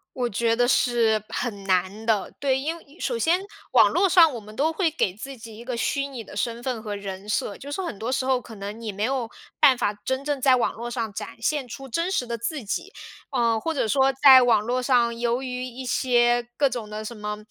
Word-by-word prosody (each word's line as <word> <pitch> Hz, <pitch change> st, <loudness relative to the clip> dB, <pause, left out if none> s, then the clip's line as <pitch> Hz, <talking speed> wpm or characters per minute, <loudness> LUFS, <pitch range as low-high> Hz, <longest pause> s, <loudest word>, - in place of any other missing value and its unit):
我 250 Hz, -2 st, 0 dB
觉 230 Hz, +3 st, +1 dB
得 245 Hz, +1 st, +2 dB
是 230 Hz, -4 st, +2 dB
很 205 Hz, -5 st, -4 dB
难 190 Hz, +3 st, 0 dB
的， 220 Hz, -3 st, +1 dB
对， 265 Hz, -2 st, +1 dB
因 315 Hz, +4 st, -2 dB
为 320 Hz, -1 st, -17 dB
首 485 Hz, -, -1 dB
先 355 Hz, -1 st, +2 dB, 0.3 s
网 225 Hz, -5 st, +6 dB
络 370 Hz, +4 st, +3 dB
上 330 Hz, -5 st, +6 dB
我 235 Hz, -, -5 dB
们 215 Hz, 0 st, -13 dB
都 315 Hz, +3 st, +1 dB
会 340 Hz, -2 st, +1 dB
给 205 Hz, -, -1 dB
自 265 Hz, +5 st, -8 dB
己 225 Hz, -1 st, -11 dB
一 235 Hz, -, -10 dB
个 245 Hz, -1 st, -4 dB
虚 280 Hz, +3 st, 0 dB
拟 250 Hz, -5 st, -7 dB
的 -, -, -12 dB
身 235 Hz, +2 st, -2 dB
份 250 Hz, -4 st, -3 dB
和 210 Hz, -2 st, -5 dB
人 200 Hz, 0 st, -7 dB
设， 205 Hz, -1 st, -1 dB
就 285 Hz, +1 st, -9 dB
是 380 Hz, -, -2 dB
很 275 Hz, -, -5 dB
多 230 Hz, +3 st, -3 dB
时 260 Hz, 0 st, 0 dB
候 260 Hz, -2 st, +2 dB
可 225 Hz, -2 st, -11 dB
能 205 Hz, +3 st, -7 dB
你 220 Hz, -2 st, -4 dB
没 200 Hz, +2 st, -4 dB
有 250 Hz, -2 st, -1 dB, 0.3 s
办 260 Hz, -3 st, +6 dB
法 205 Hz, -, 0 dB
真 260 Hz, +2 st, -2 dB
正 290 Hz, -3 st, -1 dB
在 260 Hz, -1 st, +5 dB
网 245 Hz, -, 0 dB
络 235 Hz, +2 st, -6 dB
上 230 Hz, -4 st, -3 dB
展 210 Hz, +1 st, -7 dB
现 270 Hz, +2 st, -1 dB
出 270 Hz, +3 st, -8 dB
真 335 Hz, +9 st, -1 dB
实 255 Hz, -10 st, 0 dB
的 235 Hz, 0 st, -4 dB
自 245 Hz, +3 st, -4 dB
己。 385 Hz, -, -3 dB, 0.4 s
呃， 235 Hz, -4 st, +1 dB
或 325 Hz, -, -2 dB
者 250 Hz, -, 0 dB
说 270 Hz, +3 st, +3 dB
在 260 Hz, -2 st, +10 dB
网 225 Hz, -4 st, +3 dB
络 250 Hz, +3 st, -1 dB
上， 240 Hz, -2 st, +2 dB
由 240 Hz, +2 st, 0 dB
于 250 Hz, -1 st, -4 dB
一 255 Hz, +1 st, -7 dB
些 240 Hz, -1 st, +2 dB
各 285 Hz, -, +4 dB
种 230 Hz, -4 st, -5 dB
的 215 Hz, 0 st, -6 dB
什 235 Hz, -, -6 dB
么， 210 Hz, 0 st, -4 dB
240 Hz, 260 characters per minute, -24 LUFS, 220-270 Hz, 0.4 s, 在